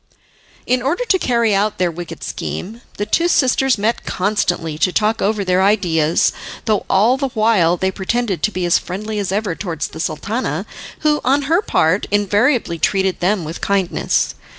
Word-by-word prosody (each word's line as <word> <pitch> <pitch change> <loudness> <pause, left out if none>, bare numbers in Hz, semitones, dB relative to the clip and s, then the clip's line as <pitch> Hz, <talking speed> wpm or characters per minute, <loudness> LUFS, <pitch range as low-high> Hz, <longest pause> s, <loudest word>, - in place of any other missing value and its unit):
In 250 0 +1
order 320 - -1
to 380 -5 +2
carry 235 -6 +1
out 205 +2 +1
their 180 -1 +1
wicked 175 0 -8
scheme 220 +6 -5 0.2
the 205 - -1
two 335 +11 +1
sisters 265 -5 +2
met 220 +3 -1
constantly 175 -5 -1
to 185 - +2
talk 215 +4 +1
over 205 -1 0
their 185 0 +2
ideas, 175 -6 +2 0.3
though 215 -3 0
all 220 +7 +4
the 275 0 -1
while 210 -6 +3
they 190 +1 0
pretended 200 +1 -2
to 215 - +1
be 185 -3 -2
as 175 - +3
friendly 210 +4 -5
as 195 -2 -2
ever 200 -2 -1
towards 165 -4 -4
the 160 - -10
Sultana, 200 +10 -2 0.4
who, 300 -1 +2
on 275 +3 +2
her 330 +7 +2
part, 180 - +1
invariably 205 - +1
treated 190 0 +1
them 185 +1 +1
with 160 +2 -7
kindness. 195 -3 0
205 Hz, 175 wpm, -18 LUFS, 180-235 Hz, 0.4 s, all